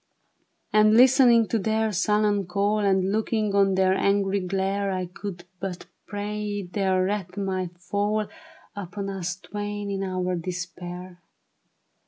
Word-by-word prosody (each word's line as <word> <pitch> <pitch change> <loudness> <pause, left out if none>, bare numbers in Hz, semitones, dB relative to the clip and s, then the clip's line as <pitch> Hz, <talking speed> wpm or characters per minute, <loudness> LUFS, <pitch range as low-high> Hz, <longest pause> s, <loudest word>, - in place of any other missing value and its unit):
And 215 0 +6
listening 245 -2 +6
to 225 - +1
their 220 +2 0
sullen 205 0 +1
call, 200 +3 +1
And 190 -2 +2
looking 215 -1 0
on 195 -1 +3
their 190 0 +3
angry 200 0 +2
glare, 195 +2 -1
I 185 -1 -2
could 180 0 -7 0.2
but 185 -1 -5 0.2
pray 205 0 -3
their 185 0 0
wrath 190 -1 -3
might 185 -3 -3
fall 205 +4 -1 0.5
Upon 200 0 -5
us 180 -2 -3
twain 205 +1 -5
in 195 -1 -2
our 185 -1 -1
despair. 180 +1 -6
195 Hz, 130 wpm, -25 LUFS, 185-210 Hz, 0.5 s, And